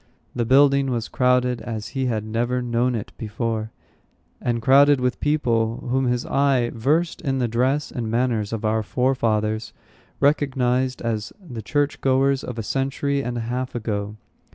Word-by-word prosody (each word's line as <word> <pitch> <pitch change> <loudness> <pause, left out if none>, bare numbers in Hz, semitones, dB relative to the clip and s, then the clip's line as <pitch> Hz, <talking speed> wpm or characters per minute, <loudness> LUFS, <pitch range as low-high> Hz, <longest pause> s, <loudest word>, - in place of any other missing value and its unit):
The 120 -1 -1
building 140 +2 +4
was 120 -3 -2
crowded, 125 -1 +1
as 110 -2 -5
he 130 -1 -2
had 110 -3 -1
never 120 +3 -1
known 120 0 0
it 110 - -5
before; 110 0 -3 0.7
and 120 -1 0
crowded 140 +3 +5
with 125 0 -1
people 120 -5 0
whom 130 +1 +2
his 125 0 0
eye, 135 -4 +2
versed 150 +9 0
in 135 -1 -1
the 125 -2 +1
dress 130 +6 0
and 115 -3 -4
manners 115 -3 0
of 115 -1 -3
our 110 +1 +1
forefathers, 110 -3 0 0.5
recognized 130 -3 +1
as 110 -2 -2
the 135 - -8
church 145 +6 -1
goers 135 0 +2
of 125 - -6
a 115 - -3
century 140 +3 -1
and 120 -1 -3
a - - -2
half 125 +3 -3
ago. 105 -2 -3
125 Hz, 160 wpm, -23 LUFS, 115-135 Hz, 0.7 s, crowded